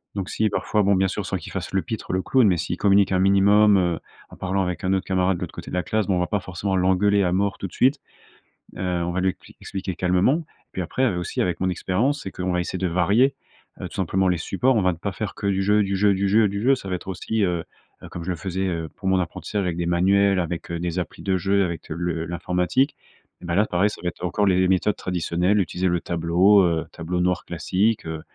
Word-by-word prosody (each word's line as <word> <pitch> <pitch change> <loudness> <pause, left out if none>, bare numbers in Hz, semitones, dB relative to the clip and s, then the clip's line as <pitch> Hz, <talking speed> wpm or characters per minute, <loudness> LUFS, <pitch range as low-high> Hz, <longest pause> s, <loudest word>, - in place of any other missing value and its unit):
Donc 95 -2 -3
si 110 0 0
parfois, 105 +1 0
bon, 100 0 +3
bien 95 +1 +2
sûr, - - -4
sans - - -1
qu'il - - -10
fasse - - -5
le 95 - +2
pitre, 110 -3 -5
le 95 - +1
clown. 130 -4 +4
Mais 90 -3 +3
s'il 85 +2 -3
communique 100 -1 +3
un 95 - +2
minimum, 100 +2 +5
heu, 85 -3 +1 0.3
en - - -12
parlant 95 +1 -1
avec 90 -2 -4
un 95 +1 +1
autre 95 0 -1
camarade 95 -1 +1
de - - -11
l'autre - - -5
côté - - -8
de - - -3
la 90 - 0
classe. 110 +5 -1
Bon 95 - +2
on - - +1
va 90 - +1
pas 105 - 0
forcément 95 +1 -3
l'engueuler 95 +2 +3
à 90 - +1
mort 100 +2 0
tout 95 - -4
de 90 - -17
suite. 135 +3 +2 0.8
Heu, - - -5
on 90 -2 -1
va 90 +1 -1
lui 95 - +2
expli - - -10
expliquer 95 -2 -5
calmement. 90 - +2 0.3
Puis 95 - -3
après, 90 +9 -2
heu, 105 -8 0
aussi 90 - -2
avec 90 -1 -1
mon 95 - +1
expérience. 110 - 0
C'est 95 - -6
qu'on 90 0 -3
va 90 - 0
essayer 90 - -4
de 95 - 0
varier, 100 +10 +2 0.5
heu, - - -4
tout - - -12
simplement 95 +1 +1
les 90 -1 +2
supports. 125 +10 +1
On 110 - +3
va 90 - +3
ne - - -11
pas 100 +4 -3
faire 100 +1 -4
que 100 - -3
du 95 -1 +1
jeu, 105 +2 +3
du 100 0 -1
jeu, 100 +1 +3
du 100 +1 0
jeu, 110 +2 +4
du 100 +1 -4
jeu. 135 +4 +4
Ça 125 - -9
va 90 - -1
être 90 - -9
aussi, 100 +4 -2
heu, 90 -3 0 0.4
heu, - - -9
comme 85 - -7
je 90 - -5
le - - -2
faisais, 95 +3 -3
heu, 85 -3 -3
pour 95 - -6
mon 95 0 +3
apprentissage 90 +3 -3
avec 90 -2 -2
des 85 - -1
manuels, 95 +3 +3
avec 85 -1 -4
des 85 +1 -2
applis 90 - -6
de 95 -1 +1
jeu, 100 +2 +2
avec 85 -3 -6
le 85 0 -3
l'informatique. 90 - 0 0.5
Et - - -10
bah, 85 -1 -1
là, 105 +3 +4
pareil, 95 +1 +1
ça - - -9
va - - -2
être 85 - -13
encore 100 +4 0
les 95 -1 +3
méthodes 95 +2 +2
traditionnelles. 90 +2 0
Utiliser 90 0 -1
le 85 0 +1
tableau, 90 +4 +3
heu, 85 -2 +1
tableau 90 +2 -3
noir 90 0 0
classique, 95 +6 0
heu. 80 -1 -5
95 Hz, 265 wpm, -23 LUFS, 90-100 Hz, 0.8 s, minimum